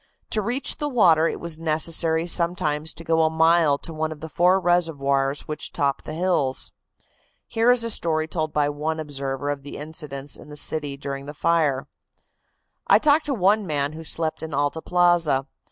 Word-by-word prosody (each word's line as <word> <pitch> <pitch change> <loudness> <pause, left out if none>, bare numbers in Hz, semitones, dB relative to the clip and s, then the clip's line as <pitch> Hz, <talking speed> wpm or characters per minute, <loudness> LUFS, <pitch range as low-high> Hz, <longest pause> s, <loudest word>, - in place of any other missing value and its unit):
To 215 - +1
reach 245 +7 -1
the 295 - -2
water 170 - +4
it - - -4
was 170 -2 -4
necessary 160 +1 +1
sometimes 170 -3 0
to 165 - -11
go 165 0 +2
a 160 - +3
mile 160 -2 +3
to 165 - -6
one 155 0 -2
of 155 - -8
the 160 +2 -8
four 180 +4 +3
reservoirs 145 -6 +1
which 150 - -6
top 140 -1 -1
the 155 - -6
hills. 165 -7 +1 0.7
Here 230 +1 +2
is 245 -2 +3
a 230 - 0
story 160 -5 +1
told 155 -1 -3
by 150 -1 +1
one 150 +2 -3
observer 140 -2 -3
of 140 -1 -5
incidents 145 -1 -6
in 150 - -14
the 150 - -9
city 145 -1 0
during 140 0 -6
the 150 - -8
fire: 150 -5 +1 1.0
"I - - +7
talked 305 +1 +3
to 285 -2 -1
one 200 0 +2
man 145 -1 -1
who 160 +1 -8
slept 160 0 -2
in 160 -2 -5
Alta 145 +3 -1
Plaza. 175 -7 +2
160 Hz, 185 wpm, -23 LUFS, 145-175 Hz, 1.0 s, I